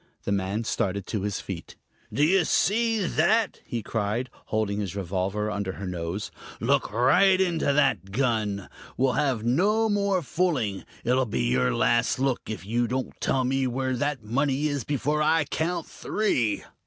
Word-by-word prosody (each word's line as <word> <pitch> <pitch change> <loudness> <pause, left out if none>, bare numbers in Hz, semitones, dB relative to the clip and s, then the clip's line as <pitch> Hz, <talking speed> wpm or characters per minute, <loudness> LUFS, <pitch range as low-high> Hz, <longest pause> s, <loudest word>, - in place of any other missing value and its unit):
The - - -2
man 100 +3 -1
started 100 -3 -1
to 105 - -3
his 100 0 -2
feet. 90 -4 -7 0.4
"Do 145 - +1
you 180 +4 +4
see 220 +5 +2
that?" 200 +8 +2
he 115 -3 -3
cried, 115 +4 -2 0.2
holding 105 -2 -1
his 100 -2 -3
revolver 100 +3 -2
under 100 -2 -3
her 100 - -7
nose. 90 +2 -4 0.3
"Look - - +1
right 180 - +4
into 170 -6 +2
that 125 -10 +1
gun! 110 -5 0 0.3
We'll 130 0 +2
have 130 -7 0
no 205 - +2
more 200 -3 +1
fooling. 130 - -1 0.2
It'll 125 +1 +2
be 65 - -1
your 65 +1 +2
last 120 0 +2
look 130 -1 0
if 110 -3 -5
you 120 +3 0
don't 130 +2 -2
tell 130 - +1
me 130 +1 +1
where 130 +1 -1
that 145 -1 -2
money 135 +6 0
is 140 -4 -2
before 145 +4 0
I 155 +1 +3
count 165 +3 -2
three." 125 - -1
125 Hz, 165 wpm, -26 LUFS, 105-150 Hz, 0.4 s, you